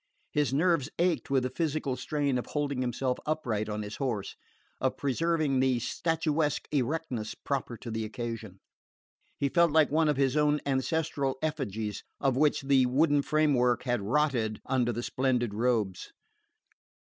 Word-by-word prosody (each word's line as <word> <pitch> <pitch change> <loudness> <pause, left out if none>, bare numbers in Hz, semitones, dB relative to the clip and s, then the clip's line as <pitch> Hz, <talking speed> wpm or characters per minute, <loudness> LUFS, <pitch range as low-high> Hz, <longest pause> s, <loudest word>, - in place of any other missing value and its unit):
His 150 -3 +1
nerves 155 -1 +2
ached 175 -1 +1
with 135 -2 +2
the 125 - -2
physical 155 -5 -1
strain 140 -2 -1
of - - -6
holding 140 -3 -1
himself 125 +1 -1
upright 115 -9 -1
on 105 0 -3
his 105 0 -7
horse, 120 -8 -2 0.4
of - - 0
preserving 150 0 +1
the 130 -1 +3
statuesque 155 +3 0
erectness 135 -5 -2
proper 130 -4 -3
to 115 - -7
the 110 0 -2
occasion. 110 -3 -6 0.8
He 140 - +1
felt 170 +3 +3
like 155 -2 +4
one 155 0 +3
of 145 - +1
his 135 -1 +2
own 150 0 +3
ancestral 140 0 0
effigies, 110 -9 -3 0.2
of 135 -3 +1
which 145 +1 +2
the 135 -2 +4
wooden 145 +3 +3
framework 140 -5 +2
had 125 -3 0
rotted 120 -2 +1
under 125 -2 +1
the 120 +1 -4
splendid 125 -5 0
robes. 110 -4 0
135 Hz, 150 wpm, -29 LUFS, 120-150 Hz, 0.8 s, like